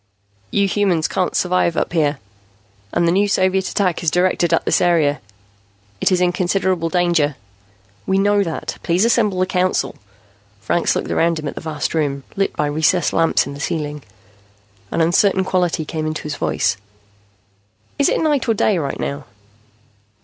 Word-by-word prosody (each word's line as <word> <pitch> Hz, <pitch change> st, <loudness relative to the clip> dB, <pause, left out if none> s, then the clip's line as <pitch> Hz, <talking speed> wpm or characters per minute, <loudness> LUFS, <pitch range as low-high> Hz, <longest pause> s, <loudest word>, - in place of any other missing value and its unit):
"You 200 Hz, -, +1 dB
human 195 Hz, -1 st, +1 dB
beings 160 Hz, -1 st, 0 dB
can't 185 Hz, -, -1 dB
survive 180 Hz, -2 st, +1 dB
up -, -, -1 dB
here. 150 Hz, -4 st, +1 dB, 0.7 s
And 170 Hz, -, +1 dB
the -, -, +3 dB
new 200 Hz, +3 st, +2 dB
Soviet 190 Hz, -1 st, +1 dB
attack 185 Hz, -4 st, 0 dB
is 170 Hz, -, +1 dB
directed 175 Hz, 0 st, +1 dB
at 165 Hz, -, +1 dB
this -, -, +2 dB
area. 155 Hz, -5 st, +2 dB, 0.8 s
It -, -, +2 dB
is 185 Hz, -, +3 dB
in 180 Hz, -1 st, +3 dB
considerable 180 Hz, -1 st, 0 dB
danger." 170 Hz, -5 st, +1 dB, 0.7 s
"We 190 Hz, -, +2 dB
know 205 Hz, +1 st, +3 dB
that. 165 Hz, -5 st, -4 dB
Please 175 Hz, +5 st, +1 dB
assemble 215 Hz, -5 st, +2 dB
the 185 Hz, -, +3 dB
Council." 185 Hz, 0 st, 0 dB, 0.7 s
Franks 110 Hz, +11 st, 0 dB
looked -, -, -3 dB
around 165 Hz, 0 st, +1 dB
him 155 Hz, -1 st, -5 dB
at -, -, -4 dB
the -, -, -7 dB
vast 155 Hz, -2 st, -3 dB
room, 140 Hz, -4 st, -1 dB
lit 195 Hz, 0 st, -1 dB
by 150 Hz, -, 0 dB
recessed 155 Hz, +3 st, +1 dB
lamps 165 Hz, -, +2 dB
in 140 Hz, -, -7 dB
the 140 Hz, -, -9 dB
ceiling. 150 Hz, -1 st, -3 dB, 0.9 s
An 165 Hz, -, -1 dB
uncertain 190 Hz, +3 st, +3 dB
quality 180 Hz, -4 st, 0 dB
came 155 Hz, 0 st, -3 dB
into 155 Hz, 0 st, -4 dB
his 150 Hz, -1 st, -4 dB
voice. -, -, 0 dB, 1.2 s
"Is 280 Hz, -, +4 dB
it -, -, +1 dB
night 295 Hz, -5 st, +1 dB
or 225 Hz, -, +3 dB
day 200 Hz, -2 st, +2 dB
right 140 Hz, -3 st, -4 dB
now?" 140 Hz, -1 st, -4 dB
175 Hz, 170 wpm, -19 LUFS, 155-190 Hz, 1.2 s, Is